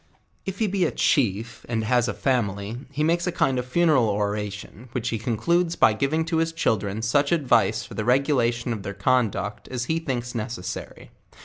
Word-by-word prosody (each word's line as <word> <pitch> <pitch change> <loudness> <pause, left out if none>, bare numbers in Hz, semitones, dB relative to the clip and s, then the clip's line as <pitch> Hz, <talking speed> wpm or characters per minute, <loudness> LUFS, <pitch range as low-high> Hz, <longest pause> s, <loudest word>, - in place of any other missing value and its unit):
If 195 0 -3
he 220 - +1
be 195 -2 0
a - - +2
chief 115 - 0
and 115 -2 0
has 120 +1 +2
a - - -1
family, 105 -5 -1 0.2
he 150 +2 -1
makes 170 +3 +1
a - - +1
kind 135 -5 +1
of 125 - -4
fu 170 +7 0
neral 145 -10 +4
oration, 105 +3 -3
which 120 -2 -1
he 115 - -2
concludes 170 +9 +1
by 110 - +5
giving 145 +7 0
to 160 - -1
his 165 0 +1
children 110 -8 -1
such 140 +5 +2
advice 115 - +2
for - - -11
the 105 +2 -3
regulation 125 -2 +2
of 110 - -5
their 95 0 -6
conduct 105 -2 0
as 125 -1 -3
he 160 +4 0
thinks 125 -6 -3
necessary. 105 -5 -6
120 Hz, 195 wpm, -24 LUFS, 110-145 Hz, 0.2 s, by